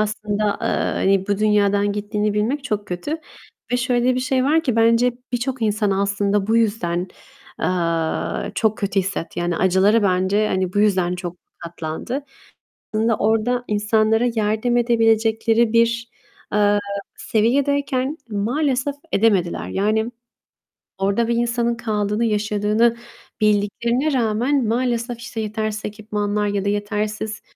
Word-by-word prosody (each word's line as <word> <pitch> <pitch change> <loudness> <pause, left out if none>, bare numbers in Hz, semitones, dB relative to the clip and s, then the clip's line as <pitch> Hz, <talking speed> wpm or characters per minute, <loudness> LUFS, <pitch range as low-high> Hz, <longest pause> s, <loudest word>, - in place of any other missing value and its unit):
aslında, 210 0 -1 0.2
eee, - - 0 0.3
hani 195 0 +2
bu 200 0 +1
dünyadan 205 -1 +2
gittiğini 210 0 -1
bilmek 250 +7 -1
çok 210 -4 -2
kötü. 180 - -3 0.6
Ve - - +3
şöyle 245 0 +1
bir 255 - -1
şey 260 -1 +1
var 315 +4 +3
ki, 250 -6 -1
bence 230 +2 +4 0.2
birçok 250 +1 -2
insan 210 -1 +1
aslında 200 0 0
bu 225 +2 +2
yüzden, 190 -6 0 0.5
eee, 165 -3 -1
çok 220 -1 +1
kötü 200 -1 -1
hissetti. 185 -3 -4
Yani 175 -1 -1
acıları 190 +5 +3
bence 195 +3 +2
hani 185 -1 -1
bu 205 - -1
yüzden 185 -4 +2
çok 180 -1 -6 0.2
katlandı. 170 - -5 0.7
Aslında 220 +1 +2
orada 225 +3 +1
insanlara 215 +2 +2
yardım 220 +3 +1
edebilecekleri 225 -1 +2
bir, 230 0 +2 0.4
eee, 205 0 +3 0.4
seviyedeyken 275 +4 0
maalesef 260 +6 0 0.2
edemediler. 200 -7 +1
Yani 215 +4 0 0.9
orada 200 +4 +1
bir 235 - +1
insanın 235 0 0
kaldığını, 210 -1 -1
yaşadığını 215 +2 +1 0.4
bildiklerine 235 +7 +1
rağmen 245 +3 +1
maalesef 240 0 -1
işte 235 -1 -7
yetersiz 215 0 -3
ekipmanlar 210 0 -2
ya 200 -1 -1
da - - +2
yetersiz, 210 +1 -2
215 Hz, 125 wpm, -21 LUFS, 205-235 Hz, 0.9 s, bence